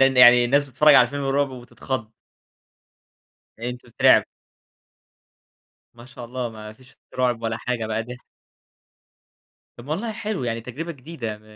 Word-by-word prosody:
يعني 125 -2 +7
الناس 140 +4 +2
بتتفرج 150 +2 +5
على 125 - +8
الفيلم 140 +3 -5
الرعب 135 +1 0
وبتتخض. 125 -2 -6 1.5
فأنتم 125 +1 -6
تترعبوا. 115 - +4 1.7
ما 120 0 -14
شاء 125 -1 -11
الله، 125 0 -4
ما 110 -1 -10
فيش 130 +4 -20
في - - -26 0.2
رعب 120 -2 0
ولا 115 0 -2
حاجة 120 -2 -3
بقى 110 +1 -2
ده 125 +2 -9 1.6
طّب 120 - -12
والله 210 +9 -3
حلو، 210 - -4
يعني 115 -1 -2
تجربة 145 +9 -6
جديدة 125 -6 -7
م 105 - -25
125 Hz, 140 wpm, -23 LUFS, 115-140 Hz, 1.7 s, على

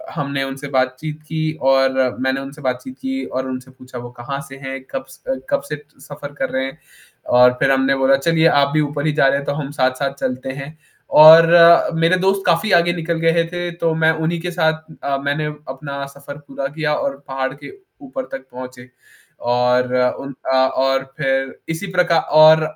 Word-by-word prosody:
हमने 140 -2 -2
उनसे 135 +1 -7
बातचीत 130 +4 -2
की 155 0 -2 0.2
और 135 0 +3 0.3
मैंने 130 +1 0
उनसे 140 +3 -10
बातचीत 130 - -4
की 265 0 -3
और 130 +1 -4
उनसे 130 0 -7
पूछा 130 -1 -12
वो 120 0 -8
कहाँ 140 +3 -5
से 135 - -10
हैं? 135 -1 -7
कब 135 0 -4
से 135 - -8
अ, - - -9
कब - - +1
से 150 -1 -5 0.2
सफ़र 145 0 -10
कर 130 - -1
रहे 130 0 -2
हैं 135 +3 -8 0.5
और 125 0 +6
फ़िर 135 - +3
हमने 135 0 +2
बोला 135 0 +3
चलिए 165 +2 +2
आप 140 -3 +3
भी 155 - +3
ऊपर 145 0 -3
ही 150 - +1
जा 135 - +3
रहे 135 - +2
हैं 140 - -5
तो 145 - -1
हम 145 -1 -5
साथ-साथ 135 0 -1
चलते 130 +1 -3
हैं 140 +3 -9 0.4
और 160 +2 +10 0.5
मेरे 165 +3 +3
दोस्त 195 +1 +1
काफ़ी 180 +4 +2
आगे 175 0 +4
निकल 170 -1 -3
गए 165 0 +2
थे 175 0 -3
तो 165 -1 +2
मैं 160 0 +3
उन्हीं 170 +1 -1
के 180 0 -4
साथ 160 -2 0 0.2
अ, 140 -1 -1
मैंने 145 +2 -1 0.2
अपना 140 +1 -6
सफ़र 140 +1 -11
पूरा 135 0 -4
किया 150 +1 -2
और 140 0 -3
पहाड़ 135 0 -3
के 145 - -11 0.3
ऊपर 265 -1 -6
तक 130 0 -7
पहुँचे। 125 0 -10 0.6
और 125 +1 +2 0.3
उन 140 0 -7 0.2
अ, - - +3
और 135 0 +1
फ़िर 135 -2 -1
इसी 165 +5 -4
प्रकार 175 -2 +3 0.2
और 155 +1 +8
140 Hz, 200 wpm, -19 LUFS, 135-160 Hz, 0.6 s, और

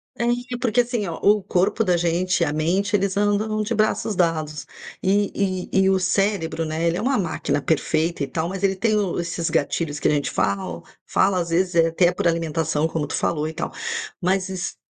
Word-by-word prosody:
É, 235 - -2 0.3
e 245 - -2
porque 245 0 +3
assim 235 -5 -2
ó, 165 - -4
o 210 0 +5
corpo 190 +5 +1
da 180 -4 +2
gente, 175 +1 +1
a 145 - -2
mente, 185 +7 +1
eles 200 0 0
andam 210 +1 +1
de 230 +2 -2
braços 215 0 0
dados 155 -4 -1 0.3
e 195 -1 0
e - - +4
e - - +4
o 190 - +3
cérebro, 185 -4 0
né, 160 +2 -2
ele 170 - +1
é - - -2
uma 265 +2 +1
máquina 170 -5 -1
perfeita 160 +1 0
e - - -2
tal, 160 +4 -2
mas 190 +1 -5
ele 195 -1 +2
tem 215 +3 +1
o 195 -4 0
esses 170 -1 -2
gatilhos 145 0 -1
que - - +1
a - - +3
gente 145 -1 0
fala, 95 -4 -2 0.2
fala 190 -1 +2
às 170 -1 -2
vezes 180 +1 +1
até 165 +2 +3
por 175 - 0
alimentação 160 -2 0
como 160 -2 -3
tu - - -3
falou 155 -2 0
e 160 - -5
tal, - - -4 0.5
mas 185 +1 +1
es 185 0 -4
180 Hz, 210 wpm, -23 LUFS, 160-200 Hz, 0.5 s, o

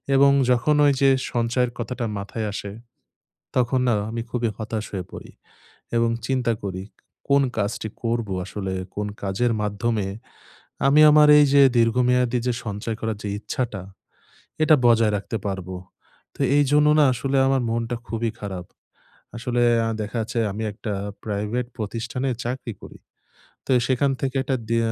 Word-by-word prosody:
এবং 140 +1 +6 0.2
যখন 125 +5 +3
ওইযে 135 -1 +4 0.2
সঞ্চয়ের 120 +1 0
কথাটা 120 0 -3
মাথায় 105 +2 -4
আসে, 100 -1 -5 0.8
তখন 125 +1 +2
না 120 - +3 0.2
আমি 115 +1 -3
খুবই 120 -2 -1
হতাশ 110 -1 -4
হয়ে 90 -2 -3
পড়ি - - -10 0.7
এবং 115 0 +2 0.2
চিন্তা 125 -3 +1
করি, 95 -1 -4 0.5
"কোন 140 0 +5 0.2
কাজটি 105 +1 -2
করবো?" 115 -4 -1
আসলে 95 -2 -4 0.2
কোন 105 0 -2
কাজের 100 +5 0
মাধ্যমে 105 0 -1 0.8
আমি 145 +2 +5
আমার 150 0 +6
এইযে 140 -1 +6 0.2
দীর্ঘমেয়াদী 125 +1 +2
যে 125 - +2
সঞ্চয় 105 +1 -4
করার 110 -2 -2
যে 105 - -4
ইচ্ছাটা, 110 -4 -4 0.8
এটা 155 0 +6
বজায় 115 -2 +4
রাখতে 100 +3 -4
পারবো? 95 -2 -4 0.6
তো - - -17 0.2
এইজন্য 145 +1 +4
না 150 - +6
আসলে 135 +3 -1
আমার 135 -1 +2
মনটা 115 +1 -2
খুবই 115 0 -2
খারাপ। 95 -4 -6 0.7
আসলে 120 +1 -1 0.2
অ্যা 115 - 0
দেখা 110 +3 -6
যাচ্ছে 115 +2 -4
আমি 110 +2 -5
একটা 105 0 -5 0.3
প্রাইভেট 105 +4 -2
প্রতিষ্ঠানে 115 +4 -3 0.2
চাকরি 125 -1 -4
করি। - - -12 0.7
তো - - -22
এ - - 0
সেখান 135 +2 +2
থেকে 135 0 -2
একটা 135 -1 -1
দে 115 - +2
115 Hz, 145 wpm, -23 LUFS, 105-125 Hz, 0.8 s, এবং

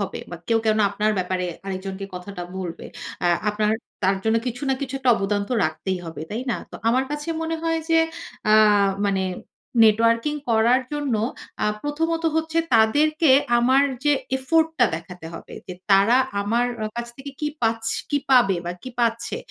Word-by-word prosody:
হবে? - - -3
বা - - -6
কেউ 230 - +3
কেন 215 0 +3
আপনার 210 +2 0
ব্যাপারে 180 0 -1 0.2
আরেকজনকে 195 +1 -5
কথাটা 180 0 -7
বলবে। 180 -3 -6 0.4
আ - - +4 0.2
আপনার 210 0 +1 0.3
তার 190 +1 +3
জন্য 220 +1 +3
কিছু 250 +3 -4
না 265 - +3
কিছু 275 -1 -4
একটা 260 -2 +2
অবদান 205 0 0
তো - - -3
রাখতেই 180 +4 -2
হবে। 160 -2 -7
তাই 230 +4 -3
না? - - 0
তো - - -8
আমার 255 +3 +2
কাছে 295 +2 -4
মনে 325 0 -2
হয় 330 0 0
যে 325 - +5 0.5
আ - - +5 0.5
মানে 195 -1 +1 0.6
নেটওয়ার্কিং 230 +6 +3 0.2
করার 230 +3 +4
জন্য 290 -4 -1 0.5
আ - - +3 0.2
প্রথমত 325 +3 -1
হচ্ছে 320 0 0 0.2
তাদেরকে 295 +8 +4 0.3
আমার 260 +3 +4 0.2
যে 295 - +4 0.2
এফোর্টটা 320 0 +2
দেখাতে 165 +1 -8
হবে। - - -10
যে 185 - -6 0.2
তারা 200 +5 +6 0.2
আমার 230 +4 +1 0.2
আ - - 0
কাছ 235 0 -3
থেকে 275 +1 -8
কি 300 - 0
পাছ 225 0 +1 0.3
কি 290 - +2
পাবে 240 -8 +5
বা 175 - -2
কি 255 - -7
পাচ্ছে। 230 0 0
230 Hz, 170 wpm, -23 LUFS, 195-280 Hz, 0.6 s, তারা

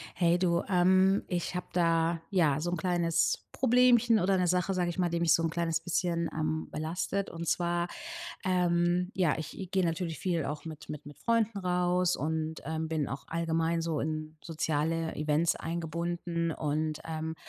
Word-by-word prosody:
Hey, 175 -1 +3
du, 170 -2 +2
ähm, 190 +1 +4
ich 175 0 -2
habe 180 - -3
da, 165 -1 +2
ja, 160 -7 +3
so 175 +3 -1
'n 175 - -1
kleines 170 -1 +1
Problemchen 245 -2 +4
oder 190 +2 +2
'ne 180 - +2
Sache, 180 +2 +1
sage 180 -1 0
ich 175 - -7
mal, 180 -1 +2
die 170 0 -1
mich 170 -3 +4
so 165 - +3
'n 165 - 0
kleines 165 -1 -1
bisschen, 170 0 0
ähm, 155 0 -2
belastet. 175 +5 -2
Und 170 0 -6
zwar, 175 0 0 0.6
ähm, 180 -1 +2
ja, 175 -5 +2
ich 170 +4 -6
gehe 190 -1 +2
natürlich 165 -1 -2
viel 170 -4 -1
auch 150 +1 -4
mit 160 -2 -9
mit 150 -1 -7
mit 145 - -11
Freunden 230 -2 +1
raus 180 -1 +1
und, 160 +2 -2
ähm, 160 0 -3
bin 155 -3 -1
auch 135 +2 -6
allgemein 165 0 0
so 165 -2 -1
in 155 +1 -4
soziale 160 0 -1
Events 150 +2 +1
eingebunden. 170 0 -2
Und, 155 +1 -2
ähm 160 0 -4
170 Hz, 175 wpm, -30 LUFS, 160-180 Hz, 0.6 s, ähm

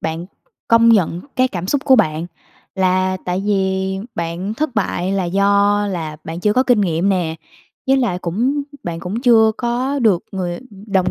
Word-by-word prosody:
bạn 165 +2 -4 0.4
công 230 0 +5
nhận 180 -6 +3 0.2
cái 255 0 +3
cảm 180 -4 -5
xúc 275 +7 -1
của 265 - +6
bạn. 165 -6 +1 0.5
Là 185 0 +1
tại 180 +2 -2
vì 190 -1 0 0.2
bạn 170 +5 -3
thất 295 -2 -2
bại 190 -2 -1
là 195 -2 0
do 200 +2 +2
là 160 -5 -4
bạn 165 +2 -6
chưa 210 +2 +2
có 255 +4 +3
kinh 245 -5 +3
nghiệm 175 0 +1
nè. 175 -5 0 0.5
Với 270 - +4
lại 230 -9 0
cũng 240 - -1 0.2
bạn 165 -1 -5
cũng 190 +7 -4
chưa 225 -3 +5
có 255 +4 -1
được 210 -8 +2
người 180 -3 -3 0.3
đồng 190 -3 +1
195 Hz, 180 wpm, -18 LUFS, 175-230 Hz, 0.5 s, của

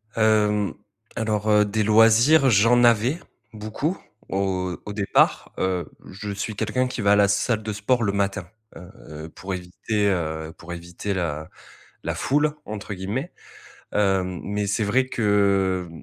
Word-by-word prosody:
Hem, 105 -2 +2 0.4
alors, 110 -1 -1
heu, 105 0 +5
des 110 +1 -1
loisirs, 115 +7 +5
j'en 115 +3 +4
avais 120 +6 +3 0.3
beaucoup 110 - -3 0.3
au 95 -2 -1
au 105 - -5
départ. 100 -1 +1
Heu, 90 -2 0 0.2
je 100 +2 -7
suis 100 +2 -4
quelqu'un 110 +5 0
qui 125 - -5
va 100 -1 +3
à - - +6
la 100 -1 +4
salle 110 +2 0
de 110 0 -3
sport 115 +4 0
le 100 - +1
matin, 100 -2 -2 0.3
heu, - - -10 0.4
heu, - - -10
pour 95 +3 -7
éviter 95 +4 -2
heu, 80 -3 -2
pour 85 +1 -8
éviter 85 +4 -5
la 80 -4 -3 0.5
la - - -2
foule, 150 +2 +1
entre 105 0 -6
guillemets. 105 - -4 0.6
Hem, 95 -3 0
mais 105 0 -2
c'est 100 +2 0
vrai 130 +6 +1
que, 100 -5 +1
105 Hz, 155 wpm, -23 LUFS, 95-110 Hz, 0.6 s, à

